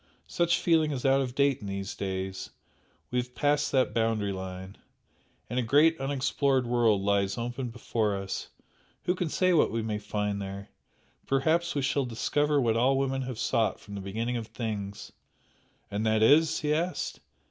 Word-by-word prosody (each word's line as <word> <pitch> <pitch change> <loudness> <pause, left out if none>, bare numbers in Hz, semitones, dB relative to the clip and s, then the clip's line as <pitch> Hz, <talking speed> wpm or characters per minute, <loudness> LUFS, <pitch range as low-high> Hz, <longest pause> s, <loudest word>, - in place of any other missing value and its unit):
Such 170 -1 +1
feeling 160 -3 +3
is 135 -3 -3
out 135 0 +4
of 125 -2 -4
date 140 -2 +2
in 105 - -6
these 100 0 -4
days 95 -1 -4 0.6
we 125 - +1
have 125 0 -5
passed 145 0 +1
that 130 -2 +2
boundary 110 -3 +1
line 95 0 -7 0.7
and 125 +3 -1
a - - +2
great 145 +7 +4
unexplored 135 -1 +1
world 115 -4 +2
lies 100 -1 +1
open 120 +2 -3
before 115 -3 -1
us 95 0 -4 0.6
who 180 - +1
can 180 -3 -2
say 185 +3 +2
what 160 - +4
we 115 0 -1
may 105 -1 -2
find 105 -1 -2
there! 100 +1 -7 0.6
Perhaps 160 +5 +1
we 140 - 0
shall 135 0 +1
discover 145 +5 +1
what 115 -4 +2
all 130 +4 +3
women 135 0 0
have 130 -3 -5
sought 115 0 +1
for - - -19
from 100 - -10
the 100 - -5
beginning 115 +5 -2
of 115 -2 -5
things 105 -3 -5 0.4
" - - -38
"And 100 +2 -2
that 110 0 +3
is?" 160 +6 +5
he 150 -1 +1
asked. 170 +4 -2
120 Hz, 180 wpm, -28 LUFS, 105-140 Hz, 0.7 s, is